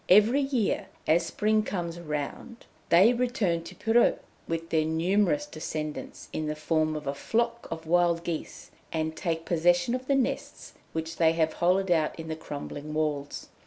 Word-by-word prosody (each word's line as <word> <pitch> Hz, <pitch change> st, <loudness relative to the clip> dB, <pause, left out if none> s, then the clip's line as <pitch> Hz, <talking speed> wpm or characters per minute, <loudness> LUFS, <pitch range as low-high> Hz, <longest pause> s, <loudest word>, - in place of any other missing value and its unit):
Every 215 Hz, +9 st, +6 dB
year 265 Hz, -6 st, 0 dB, 0.2 s
as 160 Hz, +2 st, +3 dB
spring 215 Hz, +1 st, +2 dB
comes 175 Hz, -5 st, -4 dB
round, 150 Hz, -, -5 dB, 0.2 s
they 190 Hz, +8 st, +7 dB
return 235 Hz, -9 st, 0 dB
to 185 Hz, -, -9 dB
Pirou 230 Hz, +4 st, +3 dB, 0.3 s
with 165 Hz, 0 st, -3 dB
their 160 Hz, -1 st, +3 dB
numerous 190 Hz, -, +1 dB
descendants, 155 Hz, -, -6 dB
in 155 Hz, -, -2 dB
the 150 Hz, -, -2 dB
form 155 Hz, 0 st, 0 dB
of 150 Hz, -1 st, -5 dB
a 140 Hz, -, -1 dB
flock 235 Hz, +9 st, -1 dB
of 165 Hz, 0 st, -6 dB
wild 170 Hz, 0 st, +3 dB
geese, 170 Hz, -2 st, -5 dB, 0.2 s
and 160 Hz, 0 st, -2 dB
take 165 Hz, -3 st, -2 dB
possession 175 Hz, +5 st, +2 dB
of 255 Hz, 0 st, -3 dB
the 275 Hz, -, +3 dB
nests 265 Hz, -2 st, -2 dB, 0.2 s
which 160 Hz, 0 st, -4 dB
they 165 Hz, -1 st, +4 dB
have 160 Hz, -1 st, +1 dB
hollowed 185 Hz, +2 st, +2 dB
out 160 Hz, -1 st, +1 dB
in 160 Hz, 0 st, -6 dB
the 160 Hz, -, -2 dB
crumbling 150 Hz, 0 st, -7 dB
walls. 150 Hz, -2 st, -2 dB
170 Hz, 165 wpm, -28 LUFS, 155-210 Hz, 0.3 s, they